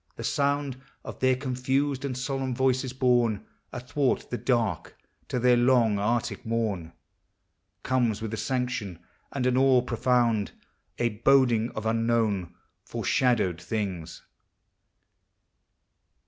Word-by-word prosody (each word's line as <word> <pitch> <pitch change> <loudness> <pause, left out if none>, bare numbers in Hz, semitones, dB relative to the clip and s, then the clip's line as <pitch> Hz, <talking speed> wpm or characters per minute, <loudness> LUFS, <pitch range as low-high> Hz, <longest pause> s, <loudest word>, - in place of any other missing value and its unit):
The - - -7
sound 140 -2 0 0.2
Of - - -8
their 130 0 +3
confused 135 +1 -1
and 130 -3 -3
solemn 135 -1 -2
voices, 130 0 +1
borne 120 -5 +1 0.3
Athwart 130 +2 -1
the 120 - -1
dark 115 -9 -1 0.3
to - - -2
their 125 0 +4
long 120 -4 +3
arctic 115 +3 -1
morn. 105 -8 -2 0.9
Comes 120 -5 +1
with 110 -1 -5
a - - -2
sanction 125 -6 -2 0.3
and 135 -3 -2
an 125 0 +2
awe 130 -2 +4
profound, 120 -3 +1 0.4
A 120 - +1
boding 120 0 +3
of 110 - -4
unknown, 115 -5 0 0.3
foreshadowed 110 -10 0
things. 95 -4 -4
120 Hz, 115 wpm, -27 LUFS, 110-130 Hz, 0.9 s, their